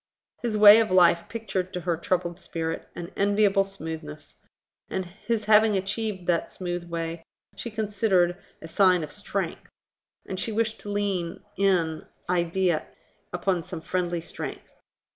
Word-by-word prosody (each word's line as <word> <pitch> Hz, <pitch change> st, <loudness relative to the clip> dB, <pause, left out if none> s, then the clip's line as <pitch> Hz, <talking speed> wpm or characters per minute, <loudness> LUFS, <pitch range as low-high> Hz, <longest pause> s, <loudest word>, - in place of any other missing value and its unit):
His 230 Hz, -3 st, -1 dB
way 210 Hz, +1 st, +10 dB
of 225 Hz, -, +2 dB
life 175 Hz, -2 st, +4 dB
pictured 195 Hz, -5 st, -3 dB
to 180 Hz, -, -3 dB
her 170 Hz, 0 st, 0 dB
troubled 175 Hz, +1 st, -1 dB
spirit 165 Hz, -2 st, -4 dB
an 175 Hz, +2 st, -7 dB
enviable 200 Hz, 0 st, +3 dB
smoothness; 160 Hz, -5 st, -7 dB, 0.5 s
and 190 Hz, -1 st, -2 dB
his 215 Hz, +4 st, -3 dB
having 215 Hz, -1 st, +5 dB
achieved 195 Hz, -1 st, -3 dB
that 175 Hz, -1 st, +1 dB
smooth 175 Hz, -1 st, -4 dB
way 165 Hz, 0 st, -4 dB, 0.3 s
she 235 Hz, -, -5 dB
considered 205 Hz, -5 st, +1 dB, 0.3 s
a -, -, -6 dB
sign 180 Hz, -1 st, +4 dB
of 155 Hz, -, -7 dB
strength; -, -, -4 dB, 0.6 s
and 185 Hz, -, -4 dB
she 225 Hz, -, -1 dB
wished 220 Hz, 0 st, -1 dB
to 205 Hz, -, -8 dB
lean 195 Hz, -4 st, -2 dB
in 175 Hz, -5 st, +1 dB, 0.2 s
idea 175 Hz, -1 st, +1 dB, 0.4 s
upon 175 Hz, 0 st, 0 dB
some 175 Hz, -1 st, -7 dB
friendly 175 Hz, 0 st, -1 dB
strength. -, -, -7 dB
185 Hz, 145 wpm, -26 LUFS, 170-205 Hz, 0.6 s, way